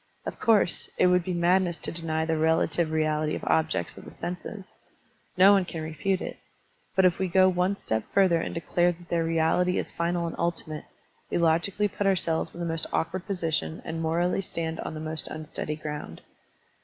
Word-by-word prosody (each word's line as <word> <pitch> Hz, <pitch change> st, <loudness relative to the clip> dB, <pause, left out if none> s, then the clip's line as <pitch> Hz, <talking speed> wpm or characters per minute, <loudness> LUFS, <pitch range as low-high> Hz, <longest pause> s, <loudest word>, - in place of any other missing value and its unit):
Of -, -, -5 dB
course, 215 Hz, -7 st, +3 dB
it -, -, +4 dB
would 180 Hz, -1 st, +4 dB
be 185 Hz, -, -3 dB
madness 175 Hz, 0 st, +2 dB
to -, -, -2 dB
deny 160 Hz, -1 st, -2 dB
the 160 Hz, 0 st, 0 dB
relative 160 Hz, +1 st, +2 dB
reality 155 Hz, -1 st, 0 dB
of -, -, -6 dB
objects 160 Hz, -, 0 dB
of -, -, -12 dB
the -, -, -10 dB
senses; 180 Hz, +3 st, -7 dB, 0.6 s
no 190 Hz, +2 st, +8 dB
one 195 Hz, -2 st, +4 dB
can 165 Hz, -3 st, -6 dB
refute 170 Hz, +5 st, -1 dB
it. -, -, -6 dB, 0.6 s
But 190 Hz, -, +5 dB
if 180 Hz, -1 st, +3 dB
we 190 Hz, -, +1 dB
go 185 Hz, +1 st, +5 dB
one 185 Hz, +2 st, +1 dB
step 110 Hz, 0 st, -1 dB
further 185 Hz, -4 st, +4 dB
and -, -, -3 dB
declare 175 Hz, +1 st, +2 dB
that 175 Hz, +1 st, -17 dB
their 170 Hz, -1 st, +1 dB
reality 165 Hz, +3 st, +2 dB
is -, -, -2 dB
final 170 Hz, 0 st, -1 dB
and 165 Hz, -, -4 dB
ultimate, 160 Hz, -3 st, -3 dB, 0.4 s
we -, -, 0 dB
logically 170 Hz, +5 st, +2 dB
put 200 Hz, 0 st, -2 dB
ourselves 170 Hz, -4 st, +1 dB
in -, -, -9 dB
the 170 Hz, -, -2 dB
most 165 Hz, -1 st, -1 dB
awkward 175 Hz, +3 st, -2 dB
position 165 Hz, -4 st, -1 dB
and 165 Hz, 0 st, -4 dB
morally 170 Hz, +4 st, +1 dB
stand 165 Hz, -3 st, -3 dB
on -, -, -5 dB
the -, -, -5 dB
most 155 Hz, 0 st, -3 dB
unsleady 155 Hz, -1 st, -4 dB
ground. 150 Hz, -, -6 dB
170 Hz, 195 wpm, -27 LUFS, 160-180 Hz, 0.6 s, no